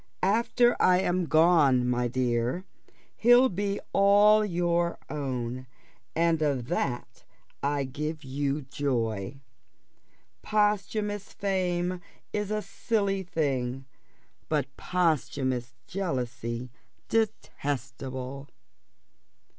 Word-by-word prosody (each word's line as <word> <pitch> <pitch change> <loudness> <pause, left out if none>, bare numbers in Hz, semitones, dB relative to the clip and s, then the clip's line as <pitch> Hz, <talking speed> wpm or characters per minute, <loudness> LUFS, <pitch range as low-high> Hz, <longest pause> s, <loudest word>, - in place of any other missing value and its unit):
After 235 +4 +3
I 180 0 +5
am 180 -2 0
gone, 155 -6 +4
my 125 0 +1
dear, 125 +6 -1 0.5
he'll 245 +3 +6
be 200 +1 -2
all 205 +2 +6
your 175 -3 0
own, 130 -3 -3 0.5
and 165 -1 +2
of 135 -5 0
that 140 -8 -3 0.4
I 140 0 0
give 150 +4 -4
you 140 +2 -2
joy. 130 -4 -2 1.0
Posthumous 210 -1 0
fame 180 -2 -1 0.3
is 210 -1 -1
a 215 0 -1
silly 200 -4 -1
thing, 135 -7 -2 0.6
but - - -1
posthumous 130 -7 0
jealousy 125 - -3 0.4
detestable." 135 - -3
155 Hz, 85 wpm, -28 LUFS, 130-195 Hz, 1.0 s, he'll